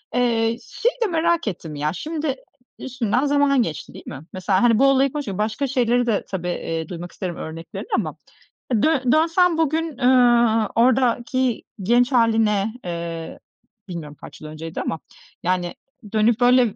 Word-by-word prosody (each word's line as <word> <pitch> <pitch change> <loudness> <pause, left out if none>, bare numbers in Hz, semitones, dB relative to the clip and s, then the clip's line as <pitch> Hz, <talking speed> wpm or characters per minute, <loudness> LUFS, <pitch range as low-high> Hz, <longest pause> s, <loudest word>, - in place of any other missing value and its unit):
Eee, 230 -2 +2
şeyi 485 +2 -1
de - - +2
merak 335 - +1
ettim 165 -6 -5
ya, 150 +2 -1
şimdi 300 - -3 0.4
üstünden 250 0 -1
zaman 285 -2 +3
geçti, 160 -9 -4
değil - - -12
mi? 135 - -7
Mesela, 185 +1 +1
hani, 230 -2 +4
bu 275 - +5
olayı 275 0 +3
konuş 295 -3 -4
başka 215 +7 -1
şeyleri 245 -2 +2
de 225 -4 0
tabii, 180 -2 -4
eee, 165 -2 -3
duymak 175 0 -7
isterim 180 -3 -5
örneklerini 165 +2 -7
ama - - -2 0.7
dön 275 -6 +2
dönsem 330 +3 +3
bugün, 320 -2 0
eee, 240 -3 +4
oradaki 250 +1 +2 0.2
genç 240 +5 +3
hâline, 220 -4 +2
eee, 170 -1 -5 0.5
bilmiyorum 155 -5 -7
kaç 145 - -12
yıl 155 - -8
önceydi 160 +1 -6
ama, 160 - -3 0.4
yani, 180 -1 -1 0.4
dönüp 220 +1 +3
böyle 250 +1 +5
235 Hz, 150 wpm, -22 LUFS, 180-270 Hz, 0.7 s, bu